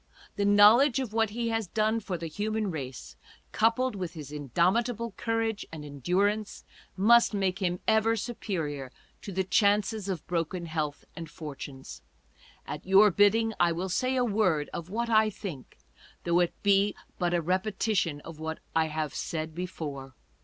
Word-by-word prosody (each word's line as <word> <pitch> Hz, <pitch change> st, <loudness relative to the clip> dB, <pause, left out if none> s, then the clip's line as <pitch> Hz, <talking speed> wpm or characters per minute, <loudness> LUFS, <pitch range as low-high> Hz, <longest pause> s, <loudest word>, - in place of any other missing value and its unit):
The 200 Hz, -, 0 dB
knowledge 215 Hz, +7 st, +6 dB
of 255 Hz, -5 st, -3 dB
what 225 Hz, -1 st, +2 dB
he 230 Hz, +2 st, -2 dB
has 225 Hz, -3 st, -1 dB
done 220 Hz, +4 st, +1 dB
for 195 Hz, -4 st, -4 dB
the 165 Hz, -, -6 dB
human 210 Hz, +5 st, -2 dB
race, 130 Hz, -, -7 dB, 0.4 s
coupled 230 Hz, +2 st, +2 dB
with 180 Hz, -4 st, -4 dB
his 150 Hz, -3 st, -8 dB
indomitable 190 Hz, -, 0 dB
courage 225 Hz, 0 st, -2 dB
and 155 Hz, -2 st, -8 dB
endurance, 195 Hz, -, -1 dB, 0.3 s
must 230 Hz, +3 st, +5 dB
make 190 Hz, -2 st, 0 dB
him 180 Hz, -1 st, 0 dB
ever 220 Hz, +1 st, +3 dB
superior 165 Hz, -, -4 dB, 0.3 s
to 200 Hz, -, -7 dB
the 190 Hz, 0 st, 0 dB
chances 205 Hz, +2 st, +2 dB
of 180 Hz, -5 st, -4 dB
broken 170 Hz, 0 st, -2 dB
health 155 Hz, -3 st, -3 dB
and 165 Hz, -3 st, -7 dB
fortunes.... 140 Hz, -4 st, -9 dB, 0.6 s
At 150 Hz, -, -6 dB
your 195 Hz, +2 st, +6 dB
bidding, 220 Hz, +4 st, +3 dB
I 175 Hz, -1 st, +4 dB
will 180 Hz, +3 st, -3 dB
say 255 Hz, +7 st, 0 dB
a 250 Hz, -1 st, +2 dB
word 190 Hz, -9 st, +1 dB
of 170 Hz, 0 st, -6 dB
what 235 Hz, +3 st, -2 dB
I 215 Hz, -1 st, +5 dB
think, 185 Hz, -, -8 dB, 0.5 s
though 170 Hz, 0 st, +2 dB
it 175 Hz, -1 st, +1 dB
be 200 Hz, 0 st, +3 dB, 0.2 s
but 175 Hz, -1 st, +1 dB
a -, -, +2 dB
repetition 185 Hz, -3 st, 0 dB
of 165 Hz, 0 st, -10 dB
what 160 Hz, 0 st, -4 dB, 0.2 s
I 160 Hz, 0 st, +4 dB
have 155 Hz, -2 st, -3 dB
'said 160 Hz, -1 st, -4 dB
before. 150 Hz, -7 st, -6 dB
190 Hz, 160 wpm, -28 LUFS, 160-220 Hz, 0.6 s, knowledge